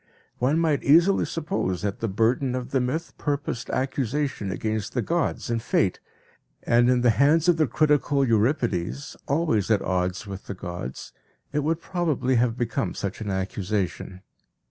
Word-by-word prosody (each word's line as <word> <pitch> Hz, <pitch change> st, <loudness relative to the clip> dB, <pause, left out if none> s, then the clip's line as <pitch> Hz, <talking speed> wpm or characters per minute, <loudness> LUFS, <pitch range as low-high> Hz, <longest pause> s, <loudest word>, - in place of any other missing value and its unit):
One 135 Hz, +6 st, +2 dB
might 160 Hz, -4 st, +2 dB
easily 170 Hz, +7 st, +5 dB
suppose 155 Hz, -, -2 dB
that 100 Hz, -1 st, -2 dB
the 115 Hz, -, -1 dB
burden 120 Hz, +6 st, +1 dB
of 125 Hz, 0 st, -5 dB
the 135 Hz, -, +2 dB
myth 145 Hz, +7 st, -2 dB
purposed 145 Hz, -5 st, -2 dB
accusation 130 Hz, -3 st, -1 dB
against 110 Hz, +1 st, -3 dB
the 125 Hz, -, 0 dB
gods 170 Hz, -7 st, -1 dB
and 115 Hz, -1 st, 0 dB
Fate, 105 Hz, -5 st, +1 dB, 0.6 s
and 120 Hz, +1 st, +4 dB
in 125 Hz, -1 st, +3 dB
the 120 Hz, -1 st, +5 dB
hands 150 Hz, +7 st, +3 dB
of 175 Hz, -2 st, +5 dB
the 155 Hz, -2 st, +3 dB
critical 145 Hz, 0 st, +2 dB
Euripides, 115 Hz, -, 0 dB
always 140 Hz, -, +1 dB
at 105 Hz, -3 st, +3 dB
odds 90 Hz, +2 st, -1 dB
with 100 Hz, -1 st, -8 dB
the 100 Hz, -, -5 dB
gods, 90 Hz, -7 st, -7 dB, 0.4 s
it 150 Hz, -, +1 dB
would 160 Hz, +3 st, 0 dB
probably 160 Hz, -8 st, 0 dB
have 120 Hz, 0 st, +1 dB
become 120 Hz, +2 st, -2 dB
such 100 Hz, +2 st, -4 dB
an 105 Hz, -, -4 dB
accusation. 95 Hz, -1 st, -3 dB
125 Hz, 160 wpm, -25 LUFS, 105-145 Hz, 0.6 s, easily